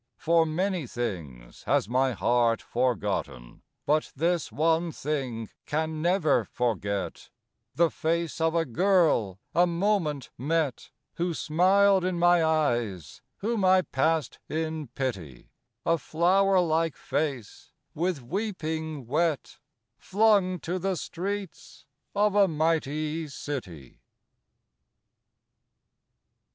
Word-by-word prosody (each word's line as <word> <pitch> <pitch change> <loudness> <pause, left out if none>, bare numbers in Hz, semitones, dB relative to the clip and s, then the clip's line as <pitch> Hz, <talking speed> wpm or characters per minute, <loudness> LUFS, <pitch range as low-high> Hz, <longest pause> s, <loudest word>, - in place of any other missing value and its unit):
For 165 0 +3
many 180 -1 -1
things 80 - -6
has - - +2
my 130 +2 +1
heart 120 0 +2
forgotten, 105 - -2 0.2
But 155 +1 +1
this 170 +3 0
one 165 +2 +1
thing 130 -8 -3 0.2
can 155 +1 -2
never 170 -3 +2
forget 100 -5 -3 0.5
The 170 -1 +3
face 165 0 -2
of 160 0 +2
a 165 -1 +2
girl, 155 - +2 0.2
a 175 +2 +4
moment 170 -6 0
met, 150 0 -1 0.3
Who 170 -1 -1
smiled 190 +5 +3
in 180 -1 -1
my 175 0 +4
eyes; 120 - -1 0.2
whom 225 -3 0
I 185 0 +5
passed 155 +3 0
in 160 -1 -3
pity; 95 - -5 0.3
A 165 0 +2
flower 185 +6 +3
like 165 -2 +1
face, 140 -8 -4 0.2
with 170 -4 -2
weeping 160 - -3
wet, 155 +4 -1 0.4
Flung 200 -3 +3
to 180 +2 -3
the 190 +1 -1
streets 185 -4 -6 0.3
of 205 0 +3
a 200 -1 +5
mighty 155 -1 -1
city. 105 - -7
160 Hz, 105 wpm, -27 LUFS, 130-175 Hz, 0.5 s, I